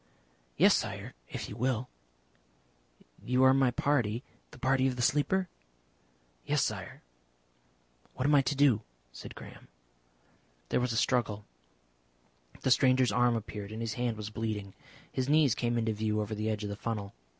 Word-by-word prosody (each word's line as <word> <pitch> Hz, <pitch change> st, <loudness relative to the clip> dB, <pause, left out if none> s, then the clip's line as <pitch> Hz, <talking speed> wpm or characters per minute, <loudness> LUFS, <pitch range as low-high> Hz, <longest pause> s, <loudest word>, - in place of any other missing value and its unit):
"Yes, -, -, +6 dB
Sire. -, -, -4 dB, 0.2 s
If -, -, -5 dB
you -, -, -8 dB
will." 125 Hz, +1 st, -1 dB, 1.4 s
"You 125 Hz, +1 st, +2 dB
are 130 Hz, 0 st, +7 dB
my 135 Hz, -1 st, +4 dB
party 125 Hz, -3 st, 0 dB, 0.3 s
the -, -, -14 dB
party 130 Hz, +1 st, +2 dB
of 130 Hz, -, -1 dB
the 125 Hz, -, -2 dB
Sleeper?" 180 Hz, +8 st, +2 dB, 1.0 s
"Yes, -, -, +1 dB
Sire." -, -, -4 dB, 1.1 s
"What 130 Hz, -, -2 dB
am 145 Hz, -, +4 dB
I 140 Hz, -, +7 dB
to 135 Hz, +2 st, -1 dB
do?" 135 Hz, -6 st, +4 dB, 0.3 s
said -, -, -10 dB
Graham. -, -, -12 dB, 1.0 s
There -, -, +2 dB
was 125 Hz, -1 st, 0 dB
a 115 Hz, -, -1 dB
struggle. 110 Hz, -4 st, +1 dB, 1.2 s
The 130 Hz, -, +1 dB
stranger's 130 Hz, -2 st, +4 dB
arm 120 Hz, +2 st, +3 dB
appeared, 105 Hz, -2 st, -5 dB
and 110 Hz, -, -6 dB
his 115 Hz, -2 st, -2 dB
hand 120 Hz, -2 st, -2 dB
was 105 Hz, 0 st, -6 dB
bleeding. 105 Hz, -3 st, -4 dB, 0.4 s
His 130 Hz, +1 st, -2 dB
knees 150 Hz, -5 st, +5 dB
came 120 Hz, -1 st, -1 dB
into 110 Hz, -1 st, 0 dB
view 105 Hz, 0 st, -1 dB
over 105 Hz, 0 st, -3 dB
the 110 Hz, +1 st, -2 dB
edge 105 Hz, -1 st, -2 dB
of 105 Hz, -, -3 dB
the -, -, -4 dB
funnel. 105 Hz, -2 st, -4 dB
120 Hz, 160 wpm, -30 LUFS, 110-130 Hz, 1.4 s, are